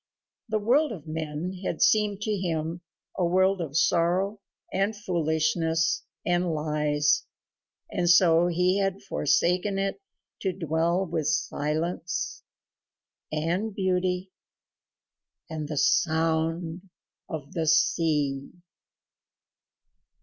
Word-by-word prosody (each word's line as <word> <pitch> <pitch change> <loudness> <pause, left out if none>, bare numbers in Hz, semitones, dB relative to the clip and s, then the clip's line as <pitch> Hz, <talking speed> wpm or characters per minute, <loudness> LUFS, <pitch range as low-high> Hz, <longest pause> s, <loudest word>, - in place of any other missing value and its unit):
The 215 - +1
world 255 +8 +2
of 175 -9 -8
men 160 +3 -4
had 165 - -2
seemed 210 -2 +3
to 215 - -1
him 170 -2 -2 0.3
a 185 - 0
world 185 +2 +3
of 155 -3 -3
sorrow 180 +5 +2 0.3
and 200 +3 +1
foolishness 160 -3 0 0.2
and 175 -2 +1
lies, 150 -1 +1 0.6
and 175 -1 0
so 175 -1 +6
he 180 +3 +2
had 195 +1 -1
forsaken 180 +4 +1
it 195 - -2 0.4
to 190 -2 -1
dwell 170 +2 0
with 160 -4 -2
silence 155 +3 -2 0.9
and 175 +7 -1
beauty 185 -1 0 1.2
and 155 -2 -4
the 150 -1 -4
sound 165 +3 +1 0.4
of 150 -4 -6
the 165 -2 -1
sea. 150 -3 +2
170 Hz, 100 wpm, -27 LUFS, 160-185 Hz, 1.2 s, so